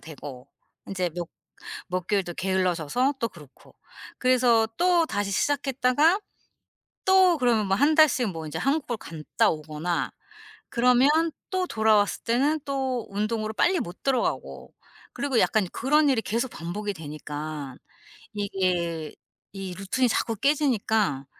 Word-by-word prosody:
되고 140 -5 -10 0.4
인제 185 -3 -2
몇 175 +1 -5 0.6
몇 180 -1 -2
개월 200 -2 +1
또 175 - -7
게을러져서 185 - 0
또 230 - -1
그렇고. 150 -8 -17 0.5
그래서 245 -3 +4
또 350 -1 +3
다시 205 -6 -2
시작했다가 285 - +2 0.9
또 375 -2 +5
그러면 235 -6 +2
뭐 195 - +2
1 290 +9 +3
달씩 295 -7 +4
뭐 165 -3 -6
이제 155 +1 -5
한국을 275 - 0
갔다 160 -6 -1
오거나 155 +2 -3 0.6
그러면 250 +2 +4 0.4
또 370 -1 0
돌아왔을 215 - +2
때는 280 +7 +1
또 265 -3 -2
운동으로 215 +2 -2
빨리 360 +10 +2
못 185 -7 -7
들어가고 260 -3 -2 0.4
그리고 275 -4 -1
약간 215 -4 +2
그런 295 +2 +2
일이 260 -5 +3
계속 235 +4 -2
반복이 205 +5 -4
되니까 150 -3 -7 0.6
이게 180 -6 -2 0.4
이 195 -2 -6
루틴이 195 +8 0
자꾸 225 0 0
깨지니까 220 - +1
215 Hz, 275 characters per minute, -26 LUFS, 175-265 Hz, 0.9 s, 또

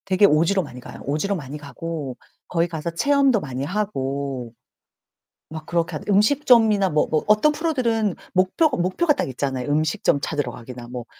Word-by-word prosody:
되게 190 +1 +4
오지로 180 +3 +3
많이 125 -4 -10
가요. - - -11
오지로 155 +8 -1
많이 145 -4 -6
가고 150 -2 -6 0.3
거기 170 -1 +1
가서 165 0 -4
체험도 275 +5 +3
많이 135 -6 -5
하고. 140 - -3 1.0
막 160 -1 -7
그렇게 170 -1 -1
하 - - -4
음식점이나 215 -2 +4
뭐, 150 0 +1
뭐 155 - +1
어떤 215 +8 +4
프로들은 240 - 0 0.2
목표가, 195 - +2
목표가 185 - +2
딱 280 - -2
있잖아요. 130 0 -3
음식점 150 -1 +1
찾으러 145 -5 -2
가기나 120 +1 -9
뭐 120 -1 -7
165 Hz, 355 characters per minute, -22 LUFS, 140-210 Hz, 1.0 s, 되게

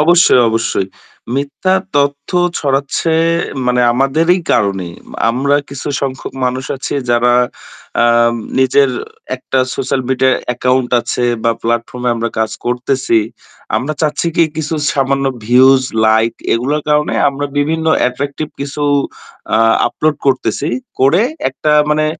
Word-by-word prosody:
অবশ্যই, 170 -4 +5
অবশ্যই। 110 -4 -1 0.5
মিথ্যা 145 +7 0 0.2
তথ্য 140 0 0 0.3
ছড়াচ্ছে 140 +3 0 0.5
মানে 125 0 +2
আমাদেরই 155 +8 +2
কারণে। 95 -4 0 0.2
মা - - -10
আমরা 140 +4 +1
কিছু 140 0 -6
সংখ্যক 135 -1 -4
মানুষ 130 +1 -2
আছি 130 - -5 0.2
যারা 120 +1 +3 0.7
আম 120 0 +3 0.2
নিজের 130 +1 +3 0.5
একটা 130 +1 -2 0.2
social 130 0 -1
media 130 0 +2 0.2
account 125 0 0
আছে 120 - -2 0.2
বা 115 - +4
platform 120 +1 -2
এ - - +3
আমরা 115 0 -1
কাজ 110 -1 0 0.2
করতেছি। 125 -1 +1 0.6
আমরা 140 +4 -2
চাচ্ছি 155 +2 0
কি, 170 - +5
কিছু 160 0 -2 0.2
সামান্য 135 0 0 0.2
views, 130 +2 +5 0.2
লাইক 110 +1 +3 0.2
এগুলোর 140 +6 -1
কারণে 150 0 +2
আমরা 140 +1 -3
বিভিন্ন 160 +3 0 0.2
attractive 140 +4 -5
কিছু 140 +1 -4 0.7
আ - - +3 0.3
upload 155 +4 -1
করতেছি। 135 +3 0 0.3
করে 135 +9 +4 0.3
একটা 150 +3 -1 0.2
মানে 155 0 +1
135 Hz, 125 wpm, -15 LUFS, 125-145 Hz, 0.7 s, অবশ্যই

